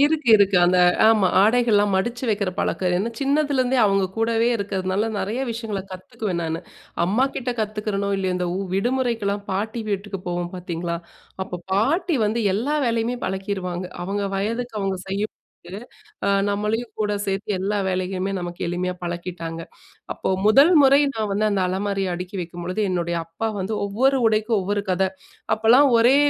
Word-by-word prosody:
இருக்கு 295 -2 +2
இருக்கு. 200 -2 +3
அந்த 180 +1 +3 0.3
ஆமா 215 -4 +5
ஆடைகள்லாம் 210 -2 +3
மடிச்சு 240 +7 -1
வைக்கிற 200 -3 0
பழக்கம். 180 -1 0
ஏன்னா, 220 +5 -1
சின்னதுலேருந்தே 275 -3 +1
அவங்க 195 -1 +3
கூடவே 225 +1 +2
இருக்கிறதுனால 200 +1 -1
நிறைய 215 +7 -2
விஷயங்கள 225 -3 -4
கத்துக்குவேன் 185 0 -4
நான், 160 0 -2 0.5
அம்மாகிட்ட 250 +6 0
கத்துக்கிறனோ 210 -1 -2
இல்லையோ 190 -1 -1
இந்த 180 0 -1 0.3
விடுமுறைக்கெல்லாம் 225 -2 0
பாட்டி 215 +4 -2
வீட்டுக்கு 200 -1 -3
போவோம் 175 0 -2
பார்த்தீங்களா, 170 -1 -4 0.5
அப்போ 180 -2 -6
பாட்டி 310 - +2
வந்து 220 +3 0
எல்லா 270 +9 0
வேலையுமே 230 +1 0
பழக்கிடுவாங்க. 190 -2 -3 0.2
அவங்க 200 +2 -2
வயதுக்கு 230 +5 -2
அவங்க 195 -1 -1
செய்யும்போது, 195 -1 -6 0.5
அ - - +2 0.2
நம்மளையும் 210 +4 -2
கூட 210 -1 +1
சேர்த்து 195 +1 -2
எல்லா 205 +2 0
வேலையுமே 185 +1 -2
நமக்கு 175 0 -6
எளிமையா 180 +1 -2
பழக்கிட்டாங்க. 170 -1 -5 0.5
அப்போ - - -4 0.2
1 275 +11 +6
முறை 275 +1 +6
நான் 215 -2 -2
வந்து 215 +1 +1
அந்த 195 -2 +1
அலமாரியை 195 0 -1
அடுக்கி 180 +2 -6
வைக்கும்பொழுது 175 +4 -4
என்னுடைய 170 -1 -1
அப்பா 165 +7 -3
வந்து 195 +4 -2
ஒவ்வொரு 260 +7 +2
உடைக்கும் 220 0 +1
ஒவ்வொரு 205 +2 -1
கதை. 190 +1 +2 0.5
அப்போலாம் 235 +6 +5
ஒரே 245 +4 +5
200 Hz, 145 wpm, -23 LUFS, 185-230 Hz, 0.5 s, 1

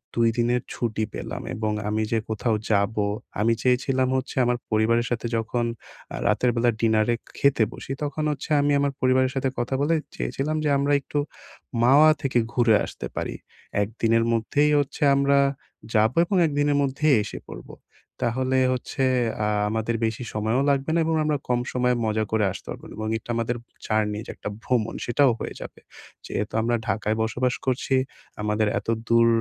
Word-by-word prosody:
২ 115 -1 +3
দিনের 120 +1 +2
ছুটি 110 -2 -2
পেলাম - - -5
এবং 110 0 -1 0.2
আমি 110 +1 0
যে 115 - +3
কোথাও 110 +1 0 0.2
যাবো, 105 +1 +2 0.4
আমি 115 +2 +3
চেয়েছিলাম 130 +1 +2
হচ্ছে 130 - -4
আমার 120 0 +1
পরিবারের 115 +2 +2
সাথে 120 0 -1
যখন 115 +2 -1 0.5
আ - - -3
রাতের 125 - +2
বেলা 120 0 +3
ডিনারে 110 +1 +3
এ - - -57 0.2
খেতে 140 -5 +4
বসি - - -8
তখন 145 +1 -2
হচ্ছে 145 +1 -6
আমি 145 0 +2
আমার 140 0 +1
পরিবারের 130 0 +3
সাথে 135 0 0
কথা 125 +2 -1
বলে 155 +3 +2 0.2
চেয়েছিলাম 135 - -2
যে - - +2
আমরা 140 +1 +1
একটু 145 - -3 0.6
"মাওয়া" 140 +6 +7
থেকে 135 -4 0 0.2
ঘুরে 120 -3 +4
আসতে - - -7
পারি। - - -3 0.5
একদিনের 115 +2 +1
মধ্যেই 145 +6 +2
হচ্ছে 145 +1 -2
আমরা 140 0 +3 0.6
যাবো 110 +5 +3
এবং 190 +2 0
একদিনের 145 -1 +1
মধ্যেই 140 +2 +2
এসে - - -7
পড়বো। - - -10 0.5
তাহলে 130 +2 +1 0.2
হচ্ছে 130 +1 -3 0.4
আ - - +1 0.2
আমাদের 110 +1 -1
বেশি 110 +2 -3
সময়ও 110 +4 0
লাগবে 140 +1 0
না - - +3
এবং 160 0 +1
আমরা 150 -1 +1
কম 125 -1 +2
সময়ে 125 0 +2
মজা 110 0 +1
করে 110 -1 +2
আসতে 100 - -10
পারবো - - -8
এবং 110 0 -3
একটা 110 - -16
আমাদের 115 +1 -1 0.3
জার্নি 105 -1 0
যে - - -5
একটা - - -6
ভ্রমণ 120 -4 0
সেটাও 130 +2 +4
হয়ে - - -5
যাবে। - - -9 0.5
যেহেতু 105 +1 -3
আমরা 120 +1 +1
ঢাকায় 105 +2 0
বসবাস 125 +2 0
করছি, 130 +1 0 0.5
আমাদের 105 +1 +1
এত - - -17 0.2
দূর 115 0 +5
120 Hz, 170 wpm, -24 LUFS, 110-135 Hz, 0.6 s, মাওয়া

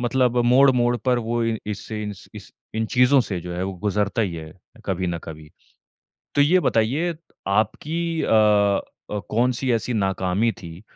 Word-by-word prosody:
मतलब 125 0 +1
मोड़-मोड़ 125 -1 +4
पर 125 +2 +1
वो 120 0 -1
इ 115 -1 0
इससे 105 +1 -5
इन्स 105 -3 -7
इस - - -11 0.2
इन 110 0 -1
चीज़ों 125 +2 +5
से 95 -7 -3
जो 90 +1 -7
है, 90 - -3
वो 95 +1 -3
गुज़रता 105 +2 0
ही 95 -5 -2
है 80 -1 -8 0.3
कभी 95 -1 -2
न 85 -1 -2
कभी, 80 -1 -10 0.8
तो - - +2
ये 175 +6 +4
बताइए, 145 +8 +1 0.3
आपकी 155 +12 -1
अ - - -1 0.8
अ, 105 - -2
कौन-सी 125 +3 +1
ऐसी 115 +1 -1
नाकामी 95 +2 0
थी 85 -1 -11
110 Hz, 165 wpm, -23 LUFS, 95-125 Hz, 0.8 s, चीज़ों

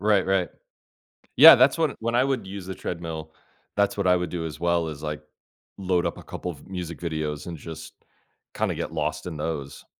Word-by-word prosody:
Right, 105 -2 +3
right. 95 -2 +2 0.9
Yeah, - - +11
that's 130 +5 +4
what 160 -4 +1
when 115 +1 -1
I 125 - +4
would 130 -7 -1
use 95 -1 -7
the 95 - -6
treadmill, 80 -2 -6 0.4
that's 100 0 +1
what 100 -2 0
I 90 - +6
would 90 -2 -2
do 85 -2 -4
as 80 - -6
well 85 -1 +1
is, 75 -1 -7
like, 75 0 -4 0.6
load 90 -2 0
up - - -2
a - - -11
couple 90 - -5
of 70 - -14
music 90 -3 -6
videos 80 -3 -3
and 85 -2 -6
just 80 +1 -9 0.6
kinda - - 0
get - - -4
lost 75 +3 -2
in 80 -3 -5
those. 75 -3 -5
85 Hz, 205 wpm, -25 LUFS, 80-95 Hz, 0.9 s, Yeah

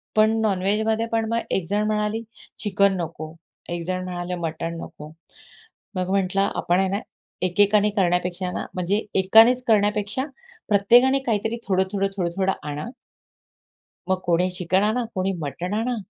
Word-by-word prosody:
पण 215 0 +5
नॉनव्हेजमध्ये 215 +2 +1
पण 225 -1 +1
मग 230 0 +1
एक 185 - 0
जण 205 +1 +1
म्हणाली 210 +1 -1 0.4
चिकन 200 -1 +3
नको, 155 -1 -6 0.4
एक 175 0 -3
जण 185 0 -2
म्हणाले 180 0 -4
मटण 165 +1 -4
नको. 150 +1 -10 0.8
मग 185 0 -2
म्हटलं 195 0 +1
आपण 175 +2 +1
आहे 190 - +1
ना, 200 +2 -1 0.4
एकेकाने 205 +3 +3
करण्यापेक्षा 180 -1 0
ना, - - -4
म्हणजे 185 +4 0
एकानेच 225 +6 +6
करण्यापेक्षा 210 +3 +1 0.5
प्रत्येकाने 240 +7 +5
काहीतरी 225 0 0
थोडं-थोडं, 190 +1 +1
थोडं-थोडं 185 +2 0 0.2
आणा. 145 +1 -4 1.2
मग 185 - +2
कोणी 175 +1 +2
चिकन 180 +1 0
आणा, 220 +4 +1
कोणी 190 +1 0
मटण 170 +6 -4
आणा, 235 +3 0
195 Hz, 140 wpm, -23 LUFS, 180-215 Hz, 1.2 s, एकानेच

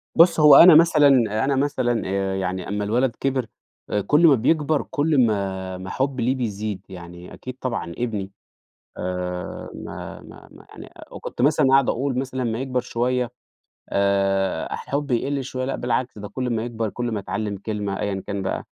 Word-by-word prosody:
بُص، 170 0 +5
هو 150 -2 +8
أنا 170 +2 +10
مثلًا 160 -3 +6 0.4
أنا 140 - +1
مثلًا 130 -4 0
آآ 95 0 -1
يعني 95 -1 -3
أمّا 105 +1 -2
الولد 115 +4 0
كِبِر 130 -3 -1 0.4
آآ 105 - 0
كل 150 - +4
ما 145 - +6
بيكبر، 150 +4 +1
كل 145 -3 +2
ما 95 -3 -2
ما 95 0 -8
حُبّي 130 -3 -1
له 130 - +2
بيزيد. 105 -5 -3
يعني 90 -1 -10
أكيد 130 0 -9
طبعًا 115 -9 -3
ابني. 105 -5 -3 0.7
آآ 90 0 -4
ما - - -8
ما - - -14
ما - - -16
يعني - - -12 0.2
وكنت - - -6
مثلًا 140 +1 +3
أقعد 135 -1 +4
أقول 130 0 -1
مثلًا 130 -1 -4
أمّا 115 -1 -2
يكبر 130 -1 -1
شوية 125 0 -1 0.6
آآ 100 -1 0
الحُب 145 0 -3
يقل 135 +3 -1
شوية 130 0 -4
لأ 135 - -2
بالعكس، 120 -1 -2
ده 105 - -7
كل 125 +2 -3
ما 115 -1 -1
يكبر، 115 -3 -3
كل 120 -1 -3
ما 105 - -2
يتعلّم 105 +1 -3
كلمة 100 -1 -4
أيًا 100 -2 -2
كان 100 -1 -3
بقى 95 - -3
120 Hz, 175 wpm, -23 LUFS, 100-135 Hz, 0.7 s, أنا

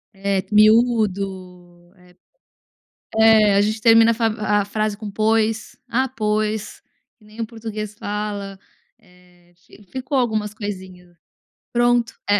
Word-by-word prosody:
É 195 -1 -1
miúdo, 195 -6 +1
eh 180 0 -22 1.0
é 220 -2 +5
a 200 - +4
gente 215 +1 -1
termina 230 0 +6
a 215 -2 0
a - - -4
frase 215 0 -2
com 210 -1 -8
pois, 220 +1 0
"ah 260 +3 +1
pois," 215 -3 -2 0.4
que 215 - -24
nem 215 +2 -9
o 225 - -1
português 215 -2 -7
fala, 205 -1 -5 0.4
eh, 180 -3 -25
fi 205 +3 -19
ficou 260 +1 -3
algumas 215 -4 -1
coisinhas. 185 -4 -8 0.6
Pronto, 240 -1 +1
é. 205 0 +4
210 Hz, 125 wpm, -21 LUFS, 195-225 Hz, 1.0 s, termina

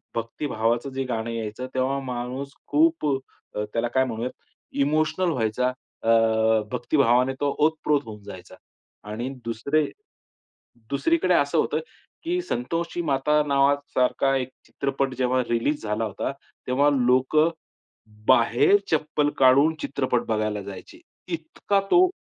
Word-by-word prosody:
भक्तिभावाचं 115 +1 -1
जे 135 0 -2
गाणं 115 -2 -3
यायचं 115 +2 -4
तेव्हा 130 +2 0
माणूस 125 +2 -4 0.2
खूप 320 - +3 0.5
अ, 105 - -1
त्याला 115 +1 0
काय 130 +2 +2
म्हणूयात? 120 +1 -3 0.5
इमोशनल 155 +5 +1
व्हायचा 125 -1 0 0.3
अ, 115 - 0 0.6
भक्तिभावाने 130 -1 +2
तो 145 - +2 0.2
ओतप्रोत 155 -2 +1
होऊन 105 -2 -9
जायचा. 95 -3 -11 0.6
आणि 115 +4 -3 0.2
दुसरे, 140 +7 0 1.1
दुसरीकडे 330 - +2
असं - - +2
होतं, - - +1 0.4
की 350 +2 0
संतोषी 170 - -2
माता 150 0 +2
नावासारखा 140 -1 +2
एक 130 -1 -3 0.2
चित्रपट 135 -1 -2
जेव्हा 130 0 +2
रिलीज 120 +6 0
झाला 105 +1 -1
होता. 105 +4 -3 0.4
तेव्हा 135 +3 +3
लोकं, 130 +5 +3 0.8
बाहेर 120 - +5 0.2
चप्पल 150 -1 +1
काढून 135 +4 +5
चित्रपट 130 -3 -1
बघायला 110 -1 -1
जायचे. 95 -1 -10 0.3
इतका 170 +4 -1
तो 365 +1 +6
130 Hz, 120 wpm, -25 LUFS, 115-150 Hz, 1.1 s, तो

